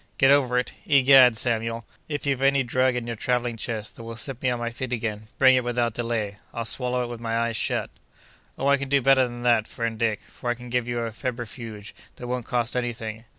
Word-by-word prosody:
"Get 135 +1 +5
over 130 -3 +3
it! 125 - 0 0.2
Egad, 135 -4 +7
Samuel, 115 -1 -1 0.2
if 145 -1 -3
you've 135 -2 0
any 135 0 +3
drug 130 +1 +1
in 120 -1 -3
your 120 0 -4
travelling 120 +1 -1
chest 110 -1 -5
that 115 - -10
will 115 0 -7
set 130 +2 -4
me 130 - +1
on 125 - 0
my 120 0 -3
feet 125 +1 -5
again, 110 -3 -3
bring 130 -1 +7
it 125 - +2
without 120 -1 0
delay. 115 -4 -2 0.2
I'll 115 -1 -3
swallow 125 +2 0
it - - -4
with 120 -1 -7
my 115 0 -1
eyes 115 0 0
shut!" - - -1 0.7
"Oh, 135 - -3
I 140 0 +5
can 140 0 -5
do 140 0 +4
better 135 0 +4
than 120 0 -8
that, 120 -3 +3
friend 115 -1 -4
Dick; 110 -3 0
for 120 - -6
I 120 - +1
can 120 0 -11
give 125 -1 0
you 120 -1 -2
a 115 -1 -3
febrifuge 115 -3 -6 0.2
that 125 - -9
won't 125 -1 -3
cost 120 -1 -1
any 120 -1 -1
thing." 110 0 -7
120 Hz, 240 wpm, -25 LUFS, 115-125 Hz, 0.7 s, Egad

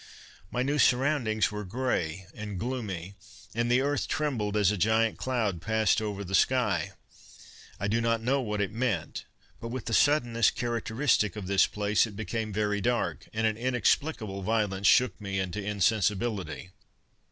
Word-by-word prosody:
"My 125 - -1
new 145 +3 0
surroundings 125 -8 +2
were 105 0 -5
grey 95 -5 -2
and 105 -4 -6
gloomy, 100 -6 -4 0.4
and 120 +1 0
the 125 +2 +4
earth 145 +1 0
trembled 115 -9 -1
as 105 -2 +4
a - - 0
giant 110 +3 +2
cloud 110 -9 -1
passed 110 +1 +2
over 105 -2 -3
the 95 0 -7
sky. 110 -7 +2 0.9
I 100 - -1
do 115 +3 +1
not 115 0 +1
know 135 +3 +1
what 105 -4 -2
it 100 -2 -1
meant, 110 -8 -2 0.3
but 115 - -6
with 125 +1 -5
the 115 - -3
suddenness 120 -5 +3
characteristic 115 -2 0
of 105 -3 -6
this 95 +1 +3
place, 105 +2 +1
it 105 - -10
became 110 +1 -3
very 105 0 0
dark, 120 +3 -1
and 110 +1 -1
an 110 -1 +1
inexplicable 120 -3 0
violence 100 -1 0
shook 125 -3 +4
me 100 -1 -3
into 95 +2 -3
insensibility. 100 -3 0
110 Hz, 160 wpm, -28 LUFS, 100-120 Hz, 0.9 s, the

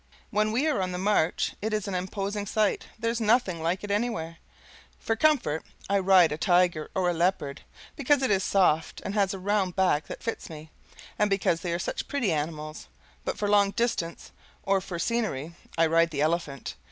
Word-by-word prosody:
When 215 0 +1
we 250 +7 +1
are 295 -10 +1
on 185 -1 -2
the - - -3
march, 185 -3 +1
it 215 +1 -2
is 210 -2 -1
an 200 - -3
imposing 200 +3 -3
sight 215 0 0
there's 230 +1 -1
nothing 215 -6 +2
like 175 +4 -1
it 205 - -4
anywhere. 200 -7 -2 0.6
For 225 - -1
comfort 240 - +2 0.3
I 200 - +4
ride 185 -3 +5
a 150 - -3
tiger 175 -3 +2
or 185 -1 +1
a 175 - +2
leopard, 165 -5 0 0.3
because 285 -1 +2
it 260 - +2
is 195 -1 +2
soft 165 -7 +2
and 200 - -3
has 200 -2 +1
a - - -5
round 190 -1 0
back 180 -6 +2
that - - -8
fits 230 -4 -4
me, 155 -1 -10 0.5
and 210 - +3
because 185 -4 +1
they 175 - -3
are 170 - 0
such 175 - -4
pretty 245 -9 0
animals; 155 0 -4 0.4
but - - -3
for 205 - -1
long 205 -1 +4
distance 230 -8 -2 0.3
or 195 -1 +2
for 180 -2 -6
scenery 170 - -2 0.2
I 165 - +5
ride 165 +1 +3
the 145 -3 -3
elephant. 155 -4 -1
190 Hz, 195 wpm, -27 LUFS, 165-210 Hz, 0.6 s, ride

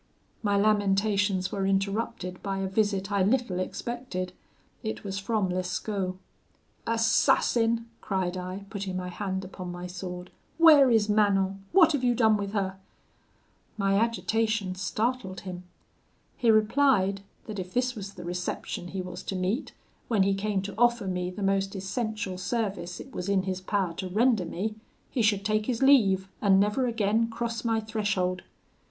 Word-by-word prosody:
"My 205 -2 +1
lamentations 200 -2 +2
were 195 - -2
interrupted 195 -2 -1
by 195 -1 -2
a 195 0 -1
visit 195 0 0
I 200 -1 +2
little 205 -2 +1
expected; 185 -3 -4 0.5
it 220 -2 -4
was 195 -1 -3
from 200 -1 0
Lescaut. 185 +1 -2 0.7
'Assassin!' 230 0 +3 0.2
cried 185 -2 -1
I, 185 +2 -5
putting 195 -3 -3
my 180 0 -4
hand 190 +1 -3
upon 185 -1 -7
my 175 0 -6
sword, 180 0 -7 0.3
'where 305 -5 +8
is 220 -3 +3
Manon? 195 -2 +2
what 335 -4 +6
have 285 -4 -1
you 245 -1 +3
done 220 -2 +4
with 200 -1 -3
her?' 190 -2 -1 1.0
My 195 -1 +1
agitation 220 -2 +1
startled 190 +1 -2
him. 180 -1 -7 0.7
He 235 - +1
replied, 215 -3 +3 0.2
that 210 -3 -6
if 180 0 -6
this 250 0 +1
was 200 -3 -8
the 175 - -8
reception 180 0 -4
he 185 +1 -4
was 180 0 -7
to 195 - -4
meet, 190 +7 -1 0.4
when 215 -5 +3
he 195 0 +2
came 195 0 -1
to 200 0 -5
offer 240 -3 +3
me 180 -1 -2
the 195 +3 -6
most 195 0 +1
essential 200 -1 -3
service 195 -4 -2
it 270 - -10
was 180 +2 -4
in 195 -2 +2
his 190 -1 -3
power 190 -2 -1
to 185 - -4
render 220 0 +3
me, 200 +6 -3 0.4
he 245 - 0
should 205 -2 +2
take 215 0 +1
his 250 0 0
leave, 200 -9 +5
and 195 -2 +5
never 210 +6 +2
again 225 0 +1
cross 230 0 -3
my 225 -1 +1
threshold. 205 -4 -1
200 Hz, 160 wpm, -28 LUFS, 185-225 Hz, 1.0 s, where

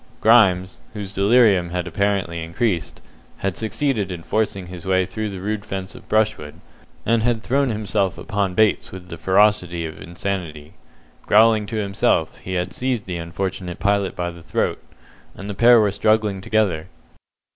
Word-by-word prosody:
Grimes, 95 -5 +4
whose 100 -3 -6
delirium 100 -3 +4
had 90 0 -3
apparently 90 -2 -1
increased, 85 +2 -2 0.4
had 95 -2 -2
succeeded 110 -3 -1
in 85 -2 -6
forcing 100 0 -1
his 90 -1 -9
way 95 -1 +2
through 105 +4 -4
the 95 -2 -7
rude 105 +2 -3
fence 95 -2 -5
of 125 -2 -14
brushwood, 110 -9 0 0.5
and 115 0 +2
had 115 -1 0
thrown 135 +1 +1
himself 105 -3 -1
upon 100 -3 -2
Bates 110 -1 +2
with 90 -1 -10
the 85 - -7
ferocity 95 -4 +2
of 80 - -8
insanity. 85 -4 -5 0.5
Growling 110 0 +5
to 115 - -5
himself, 100 -2 0
he 95 - -6
had 90 0 -2
seized 125 -4 -2
the 90 -2 -4
unfortunate 90 +1 -4
pilot 100 -1 0
by 85 0 -3
the 85 0 -13
throat, - - -2 0.5
and 100 - -8
the 105 - -4
pair 120 +3 +6
were 105 -2 +3
struggling 105 -1 +1
together. 95 -7 0
100 Hz, 160 wpm, -21 LUFS, 90-110 Hz, 0.5 s, pair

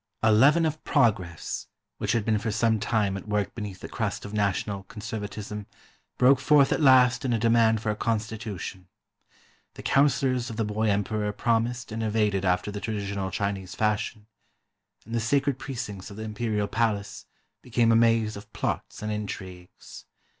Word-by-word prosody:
A 110 - +5
leaven 145 +10 +5
of 155 0 -2
progress, 105 - 0 0.3
which - - 0
had 115 -3 0
been 110 -2 +2
for 110 - -2
some 110 +1 +2
time 105 -2 0
at 100 - -7
work 105 -1 -1
beneath 100 -4 -6
the - - -6
crust - - -3
of 100 - -8
national 100 -1 -1
conservcttism, 105 -1 -6 0.5
broke 130 +1 +5
forth 140 0 +4
at - - -1
last 130 -2 +5
in 125 -3 0
a - - +2
demand 115 -1 +3
for 105 - +1
a - - -3
constitution. 105 -4 -4 0.9
The - - -9
councilors 135 -3 +2
of 110 - -7
the 110 - 0
boy 105 +1 0
emperor 105 +1 0
promised 115 +2 -1
and 110 +1 -3
evaded 105 -3 +1
after 90 +3 +1
the 105 0 -6
tradi 105 -3 -3
tional 100 -1 -3
Chinese 95 -1 -3
fashion, 105 0 -1 0.8
and 115 - -9
the 115 - +1
sacred 135 +3 +1
precincts 120 -8 -6
of 100 - -10
the 110 - -5
Imperial 105 -1 -2
Palace 105 -2 -1 0.3
became 115 -1 +2
a - - +5
maze 115 -1 +3
of 100 +1 -11
plots - - -3
and 110 - -2
intrigues. 95 -4 -7
110 Hz, 170 wpm, -26 LUFS, 105-115 Hz, 0.9 s, A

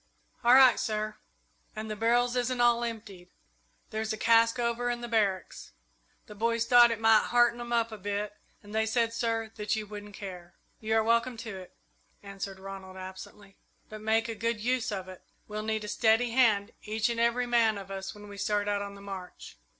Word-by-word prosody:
"All 240 +2 +7
right, 260 -3 +7
sir. 215 0 -2 0.6
And 215 +1 -5
the 215 - -4
barrels 240 +3 +2
isn't 250 0 -1
all 240 0 +4
emptied. 210 -6 -7 0.6
There's 220 0 -2
a 220 - -3
cask 230 +1 +4
over 240 0 -1
in 240 0 -2
the 240 - -5
barracks. 205 -5 -1 0.5
The 210 - -11
boys 230 +2 0
thought 240 0 +7
it 230 -2 -2
might 225 -1 +5
hearten 240 0 +3
'em 240 0 -7
up 230 -1 +1
a 215 - -8
bit, 205 +1 -3 0.3
and 205 0 -12
they 220 0 +1
said, 230 0 +1
sir, 225 -1 -2
that 210 0 -1
you 215 -1 -4
wouldn't 205 0 -9
care." 180 -4 -9 0.2
"You 220 0 -1
are 220 - +4
welcome 235 +2 +1
to 220 -3 -6
it," 185 -1 -11 0.5
answered 195 -1 -7
Ronald, 190 -1 -9
absently, 190 +1 -10 0.3
"but 215 0 -9
make 220 +1 +1
a 230 - -3
good 230 0 -2
use 245 +1 0
of 190 -2 -4
it. 185 -1 -11 0.3
We'll 210 0 -4
need 220 0 -2
a - - -6
steady 225 +2 +2
hand, 225 -4 +3
each 215 +1 -1
and 235 -1 -2
every 235 +1 +2
man 230 -3 +3
of 195 -1 -9
us, 195 0 -6
when 205 0 -12
we 200 -1 -10
start 205 0 0
out 205 0 0
on 200 0 -6
the 200 - -12
march." 190 -2 -9
220 Hz, 205 wpm, -29 LUFS, 205-235 Hz, 0.6 s, All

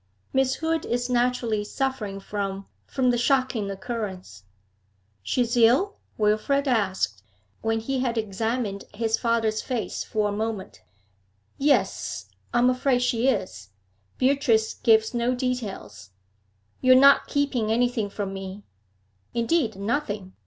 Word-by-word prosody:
Miss 265 0 +2
Hood 325 0 -1
is 245 +1 -2
naturally 240 -3 +1
suffering 215 -4 -3
from 195 -1 -4 0.2
from 255 -2 +1
the 240 - 0
shocking 255 -4 +1
occurrence.' 190 - -6 0.8
'She 175 - 0
is 235 +1 -2
ill?' 250 - +4 0.2
Wilfrid 220 +7 +1
asked, 190 - 0 0.4
when 225 0 0
he 265 +4 -2
had 245 -2 -1
examined 220 0 -2
his 225 +1 0
father's 225 -2 +1
face 250 -4 -3
for 215 -1 0
a - - -2
moment. 210 - -4 0.8
'Yes, 195 - +1 0.3
I - - 0
am 240 +1 +5
afraid 255 -1 +1
she 245 0 +1
is. 145 - -1 0.5
Beatrice 255 -5 +2
gives 220 -1 +3
no 240 +1 +1
details.' 200 - -4 0.7
'You 255 0 +6
are 255 - +7
not 275 +1 +6
keeping 260 -6 0
anything 235 -2 +1
from 200 -1 -4
me?' 195 +1 -7 0.7
'Indeed, 235 - +1
nothing. 205 -2 -3
230 Hz, 130 wpm, -25 LUFS, 205-255 Hz, 0.8 s, are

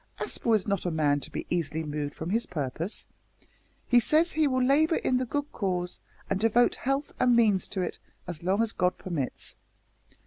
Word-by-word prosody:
"Aspel 230 -2 +1
is 210 - 0
not 200 -3 0
a - - +2
man 150 -3 +2
to - - -8
be - - -4
easily 160 -2 -1
moved 150 -1 -4
from 165 +3 -4
his 230 +3 +1
purpose. 160 - -3 0.8
He 245 - +6
says 315 +8 +3
he 310 -1 +2
will 255 -2 +1
labour 305 +5 +4
in 255 - +1
the 255 0 -1
good 290 +3 -2
cause, 180 -3 -2 0.3
and 195 - 0
devote 225 +3 +4
health 275 +2 -2
and 245 -1 +4
means 215 -5 +3
to 190 - -3
it - - -4 0.3
as 170 -3 -7
long 190 +5 +2
as 230 - -2
God 180 0 +1
permits." 160 -8 -4
200 Hz, 195 wpm, -28 LUFS, 170-250 Hz, 0.8 s, He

